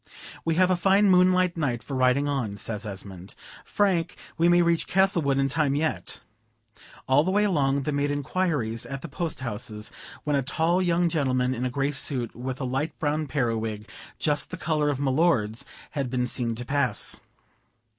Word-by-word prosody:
"We 165 -1 0
have 185 +1 +4
a - - +4
fine 195 +3 +4
moonlight 185 -1 +4
night 130 -8 -1
for 140 - -7
riding 130 +2 +2
on," 125 -8 -2
says 105 0 -3
Esmond; 95 -2 -8 0.3
"Frank, 190 -5 0 0.2
we 170 +1 +3
may 175 0 +5
reach 170 -1 +1
Castlewood 175 -8 +2
in 135 0 +2
time 140 0 +1
yet." 155 +2 -2 0.9
All 135 +3 +4
the 180 - -1
way 205 +2 +3
along 140 -8 +1
they 150 - -1
made 145 0 0
inquiries 145 -6 -1
at 135 +1 -6
the - - -5
post 165 -1 -4
houses, 105 -3 -4 0.3
when 150 -1 0
a 140 - +2
tall 165 +6 +1
young 175 -1 +2
gentleman 130 -6 +1
in 125 0 -3
a - - -2
gray 135 +3 -1
suit, 130 -4 -1
with 125 +2 -5
a 135 - -2
light 135 +5 -2
brown 155 0 -1
periwig, 115 -5 -2 0.3
just 150 -2 0
the 185 - -6
color 155 -3 0
of 145 - -1
my 135 -1 0
lord's, 130 -6 +1 0.3
had 140 -4 -2
been 125 0 0
seen 120 -2 -1
to 120 +2 -6
pass. 130 -7 +1
140 Hz, 185 wpm, -26 LUFS, 125-170 Hz, 0.9 s, may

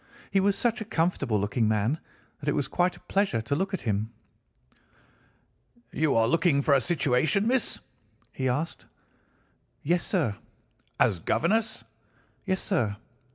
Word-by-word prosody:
He 195 - +3
was 195 +1 +2
such 240 -1 0
a - - -4
comfortable 160 - 0
looking 105 +3 0
man 110 +8 +1 0.4
that 150 - -2
it - - +1
was 140 - 0
quite 180 +1 0
a - - -19
pleasure 195 - 0
to 140 +6 -2
look 190 +5 -1
at 190 - -3
him. 110 -1 -1 1.8
"'You 155 -1 +1
are 115 0 +4
looking 160 0 +2
for 145 - +3
a 135 - +4
situation, 150 - +2
miss?' 250 0 +1 0.6
he 130 -1 -1
asked. 150 +7 -3 1.0
"'Yes, 170 +4 +1
sir.' 145 - 0 0.6
"'As 90 - +3
governess?' 220 - 0 0.6
"'Yes, 190 0 0
sir. 120 - 0
155 Hz, 145 wpm, -27 LUFS, 120-190 Hz, 1.8 s, are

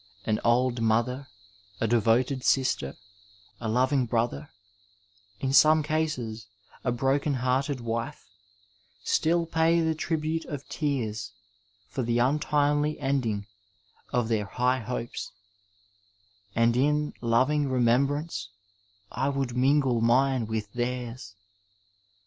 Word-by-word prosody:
An 110 -1 +1
old 120 0 +2
mother, 120 +4 +1 0.5
a - - +1
devoted 120 +4 +2
sister, 130 - +1 0.6
a 115 - -3
loving 130 +2 +2
brother, 115 -11 -1 0.9
in 135 0 -1
some 155 +2 +6
cases 145 -9 -2 0.4
a 125 - +1
broken 135 +4 +1
hearted 130 +2 0
wife, 115 0 -4 0.8
still 170 +7 +2
pay 165 +1 +2
the 160 -1 +1
tribute 160 0 -2
of 145 -2 -7
tears 115 -8 -2 0.5
for 130 - -4
the 120 -1 0
untimely 145 +3 +1
ending 125 -7 -1 0.7
of 120 -2 +1
their 110 -2 0
high 125 +5 0
hopes, 120 0 -5 1.2
and 115 +1 +3
in 150 +3 +1
loving 130 +5 +2
remembrance 130 -2 +1 0.6
I 135 +4 -1
would 135 -3 -2
mingle 130 -2 +3
mine 125 0 +3
with 110 -2 -4
theirs. 120 -3 -4
125 Hz, 110 wpm, -27 LUFS, 115-145 Hz, 1.2 s, some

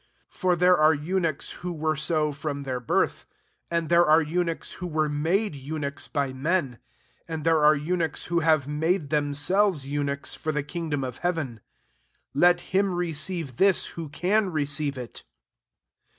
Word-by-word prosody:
12 - - -21
For 180 -2 +3
there 180 +1 +5
are 155 0 +5
eunuchs, 165 0 -2
who 180 0 -3
were 155 -1 -1
so 155 0 0
from 145 0 -4
their 130 -2 -3
birth; 125 - 0 0.4
and 170 -1 -1
there 170 +2 +5
are 155 +1 +5
eu^ 175 +4 0
nuchs, 165 -1 -4
who 180 - -4
were 155 -2 0
made 165 +8 0
eunuchs 140 0 -5
by 140 -3 -1
men; 140 -2 -1 0.5
uid 160 -2 -4
there 165 -2 +3
are 150 +1 +7
eunuchs^ 160 0 -1
who 170 +1 +1
have 155 -4 +2
made 155 +1 0
themselves 150 +3 +1
eu 145 +1 -2
nuchs 140 0 -3
for 155 - -3
the 150 -2 -1
kingdom 150 -2 -3
of 125 -2 -5
hea 175 - +1
ven. 130 - -5 0.7
Let 175 +4 +4
him 195 -1 +2
receive 165 -2 -2
thia, 195 0 +6 0.2
who 165 -3 -6
can 190 +7 +1
receive 145 -3 -1
it. 125 -2 -8
155 Hz, 170 wpm, -26 LUFS, 145-175 Hz, 0.7 s, are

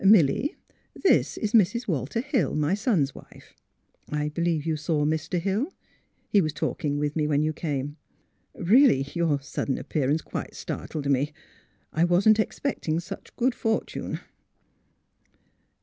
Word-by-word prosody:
Milly, 195 - +5 0.4
this 390 - +2
is 215 +1 -2
Mrs. 230 +2 +3
Walter 155 - -1
Hill, 250 - 0
my 150 +3 +1
son's 195 - +1
wife. - - -15 0.6
I 150 0 0
believe 165 -1 -1
you 160 -1 +1
saw 150 -1 0
Mr. 160 +3 0
Hill; 200 - -1 0.6
he 205 - +4
was 155 -3 -1
talking 145 -1 -2
with 145 0 -1
me 155 -2 +1
when 150 0 +2
you 155 0 0
came. 145 -2 -3 0.6
Really, 200 - +5
your 165 -4 +1
sudden 140 -1 -2
ap - - -9
pearance 150 +2 +1
quite - - -6
startled 145 -3 -5
me. 140 +2 +1 0.6
I 165 +2 +3
wasn't 195 +5 +4
expecting 215 - -1
such 170 - -9
good 250 +1 +2
fortune." 225 -2 -2
160 Hz, 140 wpm, -26 LUFS, 150-205 Hz, 0.6 s, Milly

